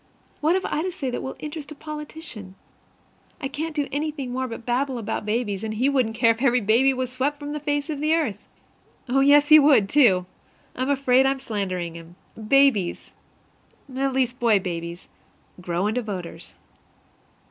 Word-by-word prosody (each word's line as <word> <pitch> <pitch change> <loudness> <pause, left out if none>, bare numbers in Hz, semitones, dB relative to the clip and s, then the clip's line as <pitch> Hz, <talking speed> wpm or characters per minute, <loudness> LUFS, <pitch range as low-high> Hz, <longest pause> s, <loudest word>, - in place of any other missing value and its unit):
What 315 +4 +2
have 380 - -1
I 305 - -1
to 370 +2 -2
say 270 -6 -4
that - - -3
will 265 - -6
interest 300 -1 -7
a - - -8
politician? 300 - -9 0.8
I 275 - -3
can't 305 +3 -5
do 290 -2 -1
anything 290 -2 -3
any - - -5
more 260 +1 -2
but 230 -1 -8
babble 255 +2 0
about 220 -1 -4
babies, 210 -2 -1
and 215 0 -3
he 255 +5 +2
wouldn't 250 -5 0
care 230 -1 +4
if 225 +1 -4
every 250 -2 +3
baby 235 +5 +3
was 255 -1 -3
swept 270 +3 -1
from 290 0 -6
the 300 - -3
face 290 -1 -1
of 305 -3 -4
the 310 +2 +2
earth. 250 -12 -1 0.7
Oh, 260 +2 +2
yes, 290 +2 +5
he 310 0 +10
would, 280 -9 +5
too! 200 -8 +4 0.5
I'm 255 +2 -2
afraid 265 -1 +3
I'm 270 0 +1
slandering 185 -8 -3
him. 165 +1 -12 0.3
Babies 270 -9 +2 0.8
at 270 0 0
least 255 -1 0
boy 230 -3 +4
babies 170 -2 -5 0.5
grow 175 +1 -2
into 220 +4 0
voters. 180 -6 -7
260 Hz, 180 wpm, -24 LUFS, 215-290 Hz, 0.8 s, he